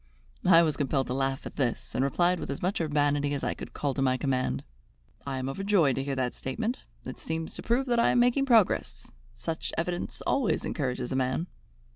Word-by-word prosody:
I 170 -2 +8
was 155 -3 0
compelled 135 -2 +1
to 125 - -3
laugh 135 0 -1
at - - -8
this, 125 -4 -1
and 130 - +1
replied 175 +6 +2
with - - -5
as 140 - -4
much 185 0 0
urbanity 145 -2 +1
as 140 - -4
I - - 0
could - - -9
call 140 -2 -1
to 135 - -2
my 130 -1 +2
command: 130 - -1 0.6
"I 135 -1 -2
am 130 0 -3
overjoyed 185 -2 +2
to 135 - 0
hear 140 0 -2
that 130 -2 -1
statement. 225 - -3 0.2
It - - -7
seems 160 0 -3
to - - -5
prove 245 +3 +1
that 240 -2 +1
I 235 - +4
am 245 - +3
making 245 +3 +3
progress. 225 -6 +2 0.2
Such 160 +8 -3
evidence 175 +1 -2
always 265 -6 +1
encourages 125 -4 -2
a - - -1
man." 130 +5 0
145 Hz, 210 wpm, -28 LUFS, 135-180 Hz, 0.6 s, I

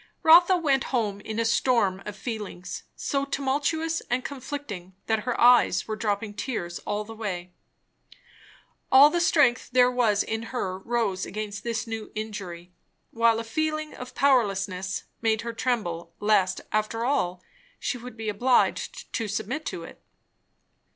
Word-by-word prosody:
Rotha 345 +3 +7
went 275 -6 +1
home 215 -6 -1
in 220 +1 -4
a 230 - +1
storm 225 -5 +2
of 205 - -5
feelings, 205 -4 -6
so 275 -1 -1
tumultuous 290 +4 -1
and 250 +1 0
conflicting 255 -10 -6
that 220 -1 0
her 250 -2 -1
eyes 245 0 +5
were 215 - -2
dropping 210 -1 -2
tears 205 -7 -4
all 210 0 -1
the 225 +2 -9
way. 180 -5 -5 1.4
All 280 +3 +8
the 345 - +1
strength 285 -7 +3
there 250 0 +5
was 225 -5 +2
in 225 0 -3
her 190 -7 -3
rose 210 -3 -1
against 210 0 -5
this 235 0 -2
new 225 -2 -6
injury; 185 -5 -6 0.4
while 230 -1 +3
a - - -3
feeling 310 +5 -2
of 250 0 -9
powerlessness 195 -8 +1 0.2
made 220 -1 +2
her 235 0 -5
tremble 175 -9 -2
lest 205 -3 +2
after 215 +2 0
all, 180 -9 0 0.3
she 250 - -3
would 240 -1 -10
be 220 -1 -5
obliged 245 - +1
to 225 - -1
submit 220 +9 -3
to - - -4
it. - - -12
225 Hz, 150 wpm, -26 LUFS, 205-255 Hz, 1.4 s, All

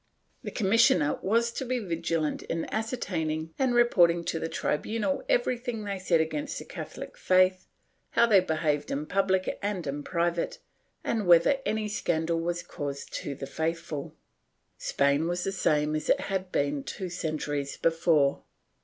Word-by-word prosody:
The - - -5
commissioner 195 -8 +3
was 230 +4 +2
to 265 - -4
be 255 0 -1
vigilant 165 -6 -1
in 165 0 -3
ascertaining 165 -9 -2
and 260 -2 +2
reporting 175 -8 +4
to 165 - -1
the 165 - -3
tribunal 225 - -1
everything 245 - 0
they 200 -2 -3
said 175 -3 +2
against 285 - -2
the - - -7
CathoUc - - -8
faith, 185 0 +3 0.4
how 235 - +4
they 210 -4 +6
behaved 155 -4 0
in 145 +2 -2
public 190 +1 0
and 200 -4 -2
in 145 +1 -3
private 170 +2 -1 0.5
and 215 -5 -1
whether 175 +11 +6
any 215 0 0
scandal 165 -5 0
was 175 +1 -2
caused 140 -3 -6
to 140 - -5
the 135 - -6
faithful.^ 160 0 -3 0.7
Spain 140 +3 +1
was 175 +1 -1
the 195 - -1
same 150 -5 +1
as 155 - -3
it - - +4
had 190 -2 -3
been 140 0 0
two 190 - -5
centuries 150 -4 -3
before. 165 -4 +2
170 Hz, 155 wpm, -28 LUFS, 155-205 Hz, 0.7 s, they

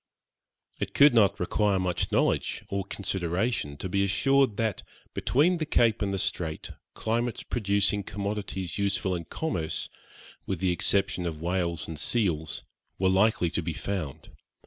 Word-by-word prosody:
It - - -4
could 145 -2 +7
not 110 -4 +4
require 100 +2 +1
much 90 -1 -1
knowledge - - +1
or 100 0 -1
consideration 95 -4 -1
to 95 - -4
be 100 +2 +1
assured 130 +4 +2
that, 110 -2 -1 0.3
between 165 +8 +2
the 155 - -1
Cape 115 -7 +3
and 100 -1 0
the 95 - -1
Strait, 80 -4 -3 0.2
climates 115 +1 -1
producing 100 -2 +1
commodities 100 -2 -4
useful 100 -1 0
in 85 -1 -5
commerce, 90 - -3 0.6
with 95 -4 -2
the 95 0 +2
exception 95 0 +1
of 80 -2 -4
whales 85 0 -1
and 80 -2 -6
seals, 80 -8 0 0.3
were 95 0 +2
likely 95 -3 +3
to - - -1
be 80 0 -3
found. 90 -7 -5
100 Hz, 145 wpm, -28 LUFS, 90-110 Hz, 0.6 s, could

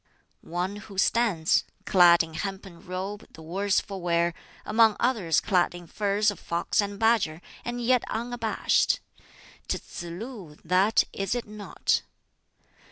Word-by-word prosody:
"One 180 +4 -3
who 205 -2 -11
stands 190 -6 +2 0.2
clad 175 -3 +6
in 160 -1 -10
hempen 190 -1 -6
robe, 190 +3 -6
the 160 - -12
worse 195 +5 +1
for 195 -2 -7
wear 170 0 +1 0.3
among 220 0 +4
others 215 - +2
clad 180 -3 +1
in 175 0 -9
furs 205 +3 +1
of 205 - -10
fox 170 +4 0
and 200 0 -4
badger, 220 -8 +2 0.2
and 240 0 -4
yet 245 0 +2
unabashed 230 0 0 0.7
'tis - - -1
Tsz - - -8
lu, 180 - -8
that, 185 +6 +4
is 195 +3 -2
it 245 - -3
not?" 210 -1 -1
195 Hz, 140 wpm, -27 LUFS, 175-220 Hz, 0.7 s, clad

